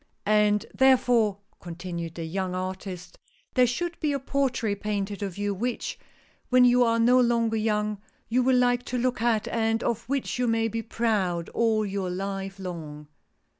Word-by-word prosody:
" - - -47
And, 210 -1 +3
therefore," 245 -6 +4 0.2
continued 170 -1 -6
the 165 - -5
young 185 +2 -3
artist, 185 -1 -6 0.3
there 250 -1 +4
should 340 +8 -3
be 300 -2 0
a 280 - -1
portrait 250 -7 -1
painted 205 -1 -3
of 195 -3 -4
you, 205 0 -1
which, 240 +5 -3 0.5
when 255 0 +6
you 245 0 +5
are 230 -1 +2
no 245 +2 +5
longer 230 -2 +2
young, 210 -1 -1 0.3
you 250 +3 +2
will 255 0 +3
like 245 0 +3
to 250 - -3
look 250 -1 0
at, 230 -2 +1
and 225 0 0
of 230 0 -2
which 275 -2 -2
you 250 - +1
may 225 0 +2
be 225 +1 -3
proud 205 -7 -1
all 220 -2 +1
your 195 -2 -3
life 195 +1 -4
long." 155 -5 -7
220 Hz, 170 wpm, -26 LUFS, 195-245 Hz, 0.5 s, when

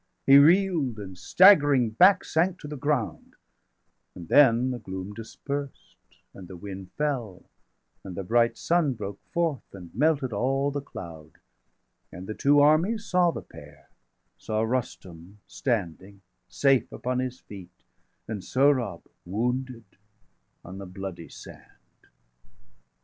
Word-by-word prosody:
520 135 - +5 0.2
He - - 0
reel'd, 140 - -2
and 95 -3 -8
staggering 145 - +5
back, 185 - +5
sank 175 +3 0
to 150 - -9
the 150 - -6
ground; 140 -5 -3 0.8
And 85 -2 -11
then 130 -3 +5
the 125 - -5
gloom 95 -1 -7
dispersed, 140 +5 -7 0.4
and 95 -2 -12
the 95 - -10
wind 95 0 -9
fell, 130 -11 -3 0.6
And 95 -2 -8
the 95 - -5
bright 115 +4 +1
sun 165 -5 +1
broke 100 -4 -7
forth, 165 -6 -1
and 90 -3 -12
melted 140 -1 +1
all 135 +6 0
The 145 0 -4
cloud; 80 - -11 0.8
and 90 +2 -9
the 110 - -5
two 145 +5 +3
armies 175 +10 +2
saw 180 -3 +2
the - - -5
pair 75 0 -16 0.5
Saw 110 0 -2
Rustum 95 -6 -5
standing, 100 - -4 0.3
safe 135 -2 +1
upon 125 0 -3
his 130 0 -4
feet, 95 -4 -12 0.6
525 110 - -6
And 100 -4 -6
Sohrab, 130 -9 +1 0.2
wounded, 125 +5 -3 0.8
on 95 +2 -9
the 100 - -8
bloody 90 -2 -8
sand. - - -16
120 Hz, 135 wpm, -26 LUFS, 95-145 Hz, 0.8 s, 520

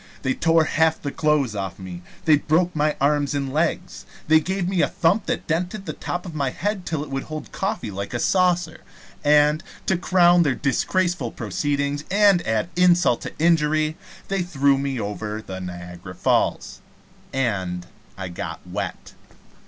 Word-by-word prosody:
They 130 -1 +1
tore 165 +2 +3
half 160 0 +2
the 140 - -4
clothes 150 -8 +1
off 95 -3 -4
me; 90 -2 -8 0.2
they 155 -3 +6
broke 170 +4 +1
my 150 0 +1
arms 145 0 +1
and 135 -2 -2
legs; 170 +3 -1 0.2
they 160 +1 +6
gave 185 +3 -2
me 185 -2 +1
a - - +3
thump 180 +6 +1
that - - -2
dented 180 +5 -2
the - - -4
top 175 +1 -4
of 175 - -7
my 140 -3 0
head 200 +6 -3
till 155 -3 -2
it 145 - -10
would 135 0 -3
hold 155 0 -7
coffee 195 - -3
like 100 +4 -5
a - - -1
saucer; 180 +1 +1 0.4
and, 150 +1 +4 0.2
to 190 - +2
crown 175 -1 +5
their 145 -6 +2
disgraceful 145 +2 0
proceedings 140 +6 -2
and 200 -2 +5
add 110 +8 0
insult 175 -8 +4
to - - -7
injury, 155 -1 +2 0.3
they 195 -1 0
threw 140 -5 +2
me 135 -2 -2
over 105 +1 -4
the 95 -3 -7
Niagara 90 -1 -8
Falls, - - 0 0.5
and 95 -9 -1 0.3
I 95 -1 -4
got 85 - -5
wet. - - -5
150 Hz, 170 wpm, -23 LUFS, 130-175 Hz, 0.5 s, they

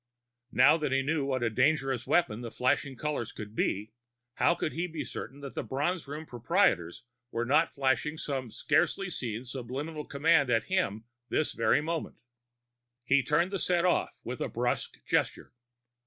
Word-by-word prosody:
Now 140 +5 +6
that 150 -4 -2
he 135 0 +2
knew 150 0 0
what 130 -3 -1
a 115 - +2
dangerous 135 0 +1
weapon 125 -11 +2
the 120 - -5
flashing 135 +3 0
colors 150 -6 -2
could 105 -1 -8
be, 105 0 -1 0.5
how 175 - +4
could 155 - -2
he 170 +2 -1
be 165 -2 -4
certain 135 +4 -7
that 140 -1 -7
the - - -2
Bronze 150 +5 -2
Room 150 +3 -6
proprietors 120 - +1 0.3
were 120 -1 -2
not 150 +6 +3
flashing 140 +3 +1
some 135 -5 -3
scarcely 175 - +1
seen 120 -4 -3
subliminal 135 +5 -5
command 145 -1 +3
at 115 -2 +3
him 175 - -1 0.3
this 155 - +1
very 115 +5 +3
moment? 165 +1 -3 0.9
He 135 +2 +4
turned 165 +7 +1
the 195 - -1
set 175 0 +2
off 180 - +1
with - - -5
a - - -1
brusque - - -2
gesture. - - 0
140 Hz, 170 wpm, -30 LUFS, 125-160 Hz, 0.9 s, Now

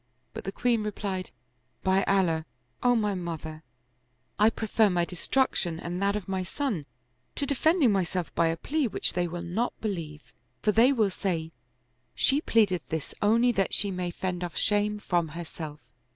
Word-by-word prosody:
But - - -7
the 195 - -2
queen 235 +2 +1
replied, 200 -3 -3 0.3
" 125 +2 -44
By 190 +1 +3
Allah, 165 -5 +2 0.3
O 245 0 +4
my 210 -3 +1
mother, 165 -3 -5 0.8
I 210 +1 +7
prefer 220 -1 +2
my 175 -2 +1
destruction 180 -3 0
and 175 +2 -4
that 200 +1 +2
of 210 -3 -4
my 190 -1 -1
son 190 - -3 0.5
to 280 - 0
defending 285 0 +3
myself 185 -3 -1
by 170 - +3
a 165 0 0
plea 295 - 0
which 215 - 0
they 175 -1 0
will 170 +1 -5
not 195 +8 -2
be 220 - -1
lieve; 155 -6 -6 0.3
for 210 - +4
they 230 +5 +5
will 220 -7 +2
say: 165 -4 -2 0.6
She 280 +2 +2
pleadeth 205 - +3
this 160 -2 -3
only 230 +4 +4
that 195 -5 +1
she 200 - +1
may 180 -1 -2
fend 180 0 -3
off 175 -2 -5
shame 210 0 +2
from 175 -5 0
herself. 160 -3 -7
190 Hz, 175 wpm, -28 LUFS, 170-220 Hz, 0.8 s, I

